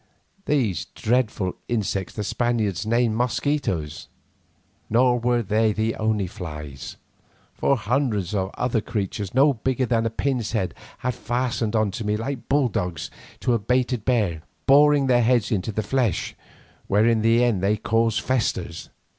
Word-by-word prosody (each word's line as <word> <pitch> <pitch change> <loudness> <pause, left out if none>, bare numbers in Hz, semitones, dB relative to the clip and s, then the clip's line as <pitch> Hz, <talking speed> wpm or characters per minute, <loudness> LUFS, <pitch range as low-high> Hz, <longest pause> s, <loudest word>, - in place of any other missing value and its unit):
These 115 - 0
dreadful 110 -6 -1
insects 100 -5 -2
the 105 - -3
Spaniards 110 -4 -1
name 115 -1 +2
mosquitoes. 120 - -1 0.8
Nor 120 +2 +3
were 120 0 +1
they 110 +2 +2
the 110 +2 0
only 110 -2 0
flies, 75 -6 -8 0.6
for 140 - +1
hundreds 110 -5 -1
of 95 -2 0
other 120 -3 0
creatures, 105 -3 -4
no 140 +2 +5
bigger 130 +2 -1
than 115 -1 +1
a - - -1
pin's 120 -1 -2
head, 100 -5 -1 0.2
had 125 0 -2
fastened 120 -2 -2
on 110 -2 +2
to 115 +4 -5
me 105 0 0
like 120 +2 -5
bulldogs 110 - 0 0.3
to 125 - +2
a 115 - +2
baited 125 +1 0
bear, 105 -11 +1 0.2
boring 145 0 +5
their 125 -2 +4
heads 120 -1 +2
into 105 0 -1
the 110 +1 -2
flesh, 125 -5 0 0.5
where 105 +2 +3
in 115 -1 +3
the 115 +2 +4
end 115 -7 +1
they 100 +2 +2
cause 115 +1 +1
festers. 130 -4 -2
115 Hz, 150 wpm, -24 LUFS, 105-125 Hz, 0.8 s, no